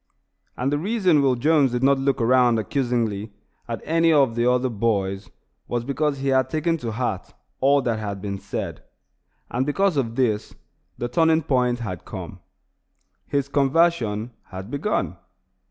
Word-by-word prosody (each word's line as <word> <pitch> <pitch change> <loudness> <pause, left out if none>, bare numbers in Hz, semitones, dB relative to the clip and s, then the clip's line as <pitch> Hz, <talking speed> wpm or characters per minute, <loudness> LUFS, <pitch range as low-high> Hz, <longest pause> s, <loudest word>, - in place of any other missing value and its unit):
And 130 +3 0
the 145 - +1
reason 185 -5 +2
Will 135 -2 +3
Jones 140 0 +3
did 125 +1 -1
not 140 0 +4
look 135 0 0
around 120 0 +4
accusingly 110 -2 -1 0.4
at - - -4
any 165 +1 +3
of 140 -6 +4
the 120 +1 +2
other 125 +1 +2
boys 100 -4 -1 0.4
was 120 -1 -2
because 140 +1 0
he 135 0 -2
had 130 -1 +2
taken 160 +3 0
to 115 -7 -5
heart 115 -5 -3 0.2
all 140 +1 +3
that 115 -3 -1
had 100 -2 -4
been 100 0 -4
said; 100 - -5 0.7
and, 125 +2 0
because 170 +4 +1
of 115 -4 -1
this, 110 -5 0 0.4
the 120 - -2
turning 160 +4 +3
point 125 -3 +1
had 90 -7 -5
come; - - -8 0.9
his 140 -1 0
conversion 140 -6 +1
had 95 +3 -9
begun. 150 +10 -1
130 Hz, 155 wpm, -23 LUFS, 115-145 Hz, 0.9 s, not